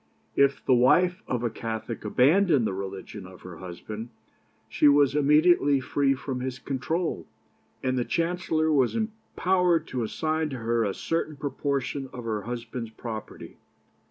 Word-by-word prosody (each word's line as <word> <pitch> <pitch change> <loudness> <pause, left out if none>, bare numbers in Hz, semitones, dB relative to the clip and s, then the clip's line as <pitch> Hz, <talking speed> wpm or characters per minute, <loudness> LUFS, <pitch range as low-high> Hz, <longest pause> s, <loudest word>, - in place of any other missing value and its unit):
If 140 0 +2
the 130 - +4
wife 180 +10 +4
of 125 -1 -2
a 120 - 0
Catholic 115 0 -5
abandoned 145 - +4
the 95 - -1
religion 95 0 -6
of 95 -1 -14
her 90 -2 -10
husband, 105 +6 -7 0.6
she 145 - +3
was 145 -1 +5
immediately 150 0 +4
free 135 +1 +1
from 130 -1 -4
his 130 0 -4
control, 160 +7 -2 0.6
and 130 0 +1
the - - +1
Chancellor 165 0 0
was 135 - +2
empowered 190 -6 0
to 125 - -2
assign 155 +7 -1
to 135 - -5
her 115 0 0
a 100 -3 -1
certain 165 -2 -2
proportion 140 -1 -2
of 125 - -7
her 110 -2 -2
husband's 120 +1 -5
property. 110 -1 -8
135 Hz, 150 wpm, -26 LUFS, 115-155 Hz, 0.6 s, was